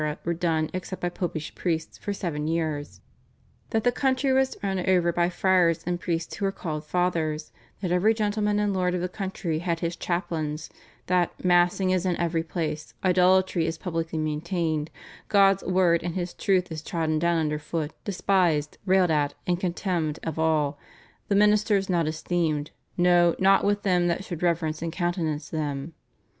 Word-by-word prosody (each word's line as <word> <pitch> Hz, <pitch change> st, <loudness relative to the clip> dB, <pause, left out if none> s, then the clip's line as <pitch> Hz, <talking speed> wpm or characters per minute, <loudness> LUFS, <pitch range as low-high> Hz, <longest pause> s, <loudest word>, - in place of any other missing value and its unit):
were 170 Hz, -, +1 dB
done 160 Hz, -2 st, 0 dB
except 185 Hz, +1 st, -5 dB
by 175 Hz, -, -1 dB
Popish 170 Hz, -3 st, -4 dB
priests 160 Hz, -3 st, -3 dB
for 205 Hz, -, -4 dB
seven 160 Hz, -6 st, -3 dB
years, 155 Hz, -3 st, -2 dB, 0.7 s
that 225 Hz, -2 st, 0 dB
the 245 Hz, -, +4 dB
country 265 Hz, +1 st, +1 dB
was 265 Hz, 0 st, +2 dB
over 190 Hz, -2 st, +2 dB
run 170 Hz, -, +2 dB
by 175 Hz, 0 st, +2 dB
friars 175 Hz, -2 st, +2 dB
and 175 Hz, 0 st, -1 dB
priests 170 Hz, -2 st, -3 dB
who 200 Hz, -, -2 dB
are -, -, 0 dB
called 155 Hz, -5 st, -5 dB
Fathers, 160 Hz, -2 st, -1 dB, 0.3 s
that 180 Hz, -, -1 dB
every 180 Hz, +5 st, +4 dB
gentleman 210 Hz, -1 st, 0 dB
and 205 Hz, -1 st, +1 dB
lord 180 Hz, -1 st, +1 dB
of 180 Hz, -, -2 dB
the 180 Hz, -, 0 dB
country 185 Hz, -4 st, -3 dB
had 170 Hz, -1 st, -2 dB
his 170 Hz, 0 st, -1 dB
chaplains, 160 Hz, -4 st, -3 dB, 0.3 s
that 180 Hz, 0 st, 0 dB
"massing 180 Hz, +1 st, +3 dB
is 185 Hz, -1 st, +1 dB
in 180 Hz, -2 st, 0 dB
every 170 Hz, -1 st, 0 dB
place, 160 Hz, -2 st, -4 dB
idolatry 185 Hz, -2 st, +3 dB
is 165 Hz, 0 st, -2 dB
publicly 165 Hz, -3 st, -3 dB
maintained, 155 Hz, 0 st, -1 dB, 0.4 s
God's 195 Hz, -2 st, +5 dB
word 180 Hz, -2 st, +2 dB
and 175 Hz, -1 st, -4 dB
his 175 Hz, -1 st, -3 dB
truth 185 Hz, -4 st, +1 dB
is 155 Hz, -1 st, -5 dB
trodden 160 Hz, -2 st, -1 dB
down 170 Hz, +1 st, +2 dB
under 150 Hz, -2 st, 0 dB
foot, 155 Hz, 0 st, -3 dB
despised, 180 Hz, -6 st, +1 dB
railed 185 Hz, -2 st, +4 dB
at, 145 Hz, -2 st, +1 dB
and 175 Hz, -1 st, 0 dB
contemned 175 Hz, -4 st, -1 dB
of 160 Hz, -1 st, -4 dB
all, 155 Hz, -3 st, +1 dB, 0.5 s
the 200 Hz, -, +1 dB
ministers 210 Hz, -1 st, +3 dB
not 170 Hz, -3 st, +1 dB
esteemed 155 Hz, -1 st, -1 dB, 0.3 s
no 175 Hz, -1 st, +4 dB
not 195 Hz, +1 st, +4 dB
with 205 Hz, 0 st, +1 dB
them 180 Hz, -3 st, +2 dB
that 175 Hz, +2 st, -1 dB
should 175 Hz, -4 st, -6 dB
reverence 165 Hz, -3 st, 0 dB
and 165 Hz, 0 st, -2 dB
countenance 170 Hz, -4 st, -2 dB
them." 150 Hz, -1 st, -3 dB
175 Hz, 170 wpm, -26 LUFS, 160-185 Hz, 0.7 s, God's